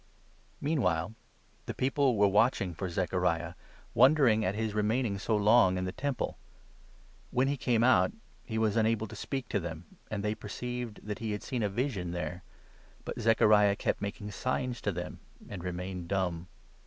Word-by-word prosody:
Meanwhile 100 - 0 0.5
the - - -4
people 130 -2 +2
were 100 0 +5
watching 100 -2 +2
for 95 +3 -4
Zechariah, 85 -1 0 0.4
wonder 140 +5 +6
21 120 -4 +6
ing - - 0
at 95 - 0
his 110 -1 -2
remaining 105 0 0
so 110 +2 0
long 105 -3 +5
in 90 - -1
the 90 - -2
Temple. 140 +3 -3 0.9
When 130 +2 +2
he 140 - +1
came 120 -4 +1
22 - - +4
out, 130 - +5 0.3
he 110 - -4
was 110 -2 +2
unable 110 -1 +2
to 110 - -10
speak 130 +3 -4
to 100 - +1
them, 80 -1 -8
and 100 -2 -3
they 105 0 0
perceived 120 +2 -6
that 105 -1 -4
he 110 -2 -2
had 105 - -5
seen 125 -3 -2
a 105 - +1
vision 100 -6 -2
there. 90 0 -4 0.6
But - - -5
Zechariah 105 -2 +5
kept - - -1
making 100 +1 -4
signs 125 +2 -2
to 100 - 0
them, 90 0 -6 0.3
and 95 -4 -7
remained 90 0 -4
dumb. 90 -3 -1
105 Hz, 180 wpm, -30 LUFS, 95-120 Hz, 0.9 s, wonder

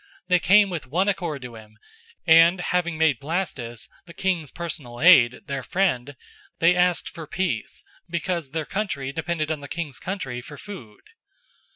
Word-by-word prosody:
They 180 -1 +5
came 195 +5 +5
with 165 -6 -5
one 180 +9 +1
accord 170 -9 -2
to 125 -1 -8
him, 110 -1 -14 0.5
and, 165 +2 +6
having 175 -2 -1
made 155 -6 +3
Blastus, 140 - -4 0.2
the 170 - -13
king's 175 -6 -1
personal 150 -8 -6
aide, 125 -8 +6
their 140 -2 -3
friend, 145 -5 -1 0.4
they 170 +2 +4
asked 180 -1 +2
for 160 -2 -8
peace, 175 - -3 0.3
because 170 -3 -2
their 155 +2 -3
country 145 -10 -3
depended 160 0 -2
on 155 - -2
the 145 - -9
king's 160 -4 -5
country 135 -11 -4
for 145 +3 -11
food. 135 - -11
160 Hz, 160 wpm, -24 LUFS, 135-180 Hz, 0.5 s, and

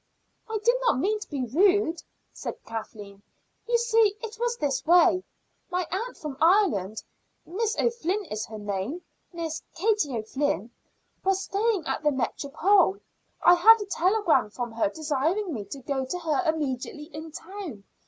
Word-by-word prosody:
"I 440 - -1
did 475 - +6
not - - +2
mean 415 +10 +1
to 420 - -9
be 280 -4 -2
rude," 340 - +3 0.3
said - - -5
Kathleen. 210 -3 -8 0.5
"You 475 0 +3
see, 455 -3 +3
it 445 -1 -5
was 475 0 0
this 275 - -1
way. 350 +2 +5 0.5
My 360 -1 -1
aunt 450 +7 -3
from 300 -5 -6
Ireland 240 - +3 0.4
(Miss 440 +6 -1
O'Flynn 425 -4 0
is 215 -8 -4
her 220 - -8
name 205 - -4 0.3
Miss 330 -2 -4
Katie 375 - +1
O'Flynn) 225 - -2 0.5
was 385 0 +1
staying 405 -4 0
at - - -2
the 300 - +3
Métropole. 310 - +2 0.4
I 350 - +8
had 445 +6 +7
a 410 - -4
telegram 385 - +2
from 240 +2 -5
her 225 -2 0
desiring 315 - -1
me 210 -5 -5
to 200 - -7
go 270 0 -2
to 260 +8 -4
her 330 0 0
immediately 300 +1 -4
in 315 +1 -7
town. 335 - -8
330 Hz, 155 wpm, -26 LUFS, 265-405 Hz, 0.5 s, I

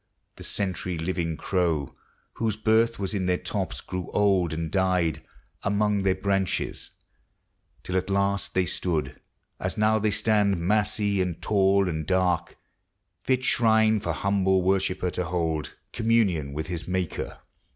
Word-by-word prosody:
The - - -9
century 90 -3 -2
living 85 -1 -2
crow, 85 -7 0 0.4
Whose 110 -3 -1
birth 110 +2 +2
was 100 +1 -3
in 95 -3 -1
their 90 0 +2
tops, - - -3
grew 90 -2 -5
old 95 -5 +3
and 80 0 -3
died 90 -4 +1 0.4
Among 105 0 +1
their 95 -1 +2
branches, 95 -1 -1 0.9
till 90 - -4
at 95 +1 0
last 100 0 0
they 95 -1 +3
stood, 80 -2 -2 0.4
As - - -3
now 110 +1 +3
they 110 +1 +1
stand, 105 -2 +2
massy 100 +2 +1
and 90 -3 -2
tall 100 -1 +3
and 80 -3 -3
dark, 90 -2 +1 0.6
Fit 130 -1 0
shrine 110 -3 +3
for 85 -4 -2
humble 95 +1 +1
worshipper 95 -1 +1
to 90 - -2
hold 80 -3 -2 0.2
Communion 110 -11 +1
with 75 +2 -4
his 85 0 -5
Maker. 90 -2 -3
95 Hz, 140 wpm, -26 LUFS, 90-105 Hz, 0.9 s, old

